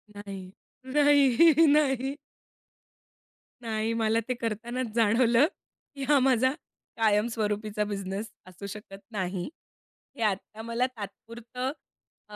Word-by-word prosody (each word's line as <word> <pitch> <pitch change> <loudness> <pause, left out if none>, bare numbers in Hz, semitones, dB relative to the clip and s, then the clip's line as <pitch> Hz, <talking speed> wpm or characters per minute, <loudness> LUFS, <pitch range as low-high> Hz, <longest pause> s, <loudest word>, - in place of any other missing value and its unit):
नाही, 195 -2 -8 0.3
नाही, 285 +2 +5
नाही. 275 -2 +2 1.5
नाही, 220 0 -1
मला 225 0 +1
ते 255 - 0
करतानाच 235 +2 -3
जाणवलं, 235 +3 +4 0.5
की 275 - -5
हा 290 - +6
माझा 260 -1 +3 0.5
कायमस्वरूपीचा 215 -1 0
बिझनेस 200 +1 -4 0.2
असू 185 +2 -10
शकत 195 -1 -9
नाही, 185 +1 -3 0.7
हे - - -7
आता 215 +1 -2
मला 235 +2 0
तात्पुरतं 230 +5 -6 0.6
अ, 210 - -10
225 Hz, 100 wpm, -28 LUFS, 210-255 Hz, 1.5 s, हा